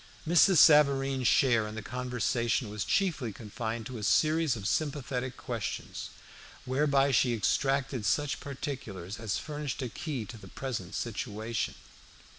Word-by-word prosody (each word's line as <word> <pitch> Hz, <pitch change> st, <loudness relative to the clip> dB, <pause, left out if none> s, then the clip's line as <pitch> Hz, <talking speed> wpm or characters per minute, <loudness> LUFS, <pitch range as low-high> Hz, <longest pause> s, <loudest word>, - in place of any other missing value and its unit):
Mrs. 175 Hz, +2 st, +6 dB
Savareen's 135 Hz, -4 st, +5 dB
share 115 Hz, -5 st, +4 dB
in 105 Hz, -, -7 dB
the 110 Hz, -, -5 dB
conversation 120 Hz, -1 st, -1 dB
was 105 Hz, -1 st, -3 dB
chiefly 155 Hz, -, 0 dB
confined 110 Hz, +2 st, -5 dB
to 125 Hz, -1 st, -6 dB
a -, -, -7 dB
series 155 Hz, +3 st, +3 dB
of 100 Hz, -4 st, -4 dB
sympathetic 130 Hz, 0 st, -2 dB
questions, 110 Hz, -8 st, -5 dB, 0.6 s
whereby 140 Hz, +1 st, +2 dB
she 120 Hz, -1 st, +3 dB
extracted 135 Hz, +3 st, 0 dB
such 145 Hz, +8 st, 0 dB
particulars 115 Hz, -9 st, -6 dB
as 110 Hz, -3 st, -2 dB
furnished 150 Hz, -3 st, -4 dB
a 125 Hz, -, -3 dB
key 135 Hz, -2 st, -4 dB
to 115 Hz, +2 st, -10 dB
the 95 Hz, -, -12 dB
present 115 Hz, -4 st, -5 dB
situation. 110 Hz, -1 st, -3 dB
125 Hz, 135 wpm, -30 LUFS, 110-140 Hz, 0.6 s, Mrs